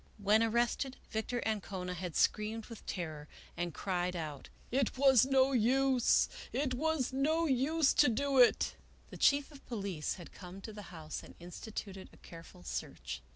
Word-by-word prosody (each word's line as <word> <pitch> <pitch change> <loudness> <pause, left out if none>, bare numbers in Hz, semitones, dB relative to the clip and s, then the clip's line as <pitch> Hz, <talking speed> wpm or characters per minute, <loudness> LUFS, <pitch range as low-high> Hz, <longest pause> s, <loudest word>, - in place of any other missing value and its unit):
When 210 +1 +3
ar 230 - +3
rested, 240 +3 0
Victor 225 +2 -2
Ancona 190 -4 -3
had 180 -2 -5
screamed 215 +1 +1
with 230 -3 -11
terror, 155 -5 -5 0.3
and 175 0 -2
cried 180 +1 -2
out, 155 -5 -6
" - - -28
It 260 - -1
was 265 -2 +6
no 270 0 +4
use! 260 +1 +3 0.2
it 270 -2 0
was 285 -1 0
no 310 +5 +2
use 285 +2 +3
to 290 - +5
do 275 +3 +1
it! 245 - +5 0.2
" - - -29
The - - -8
Chief 285 +1 +3
of 285 -2 -14
Police 200 -9 -3
had 175 - -11
come 180 0 -10
to 220 - -8
the 210 -1 -9
house 160 -3 -6
and - - -14
instituted 190 +2 -7
a - - -18
careful 165 - -13
search. 70 - -5
220 Hz, 175 wpm, -33 LUFS, 180-265 Hz, 0.3 s, was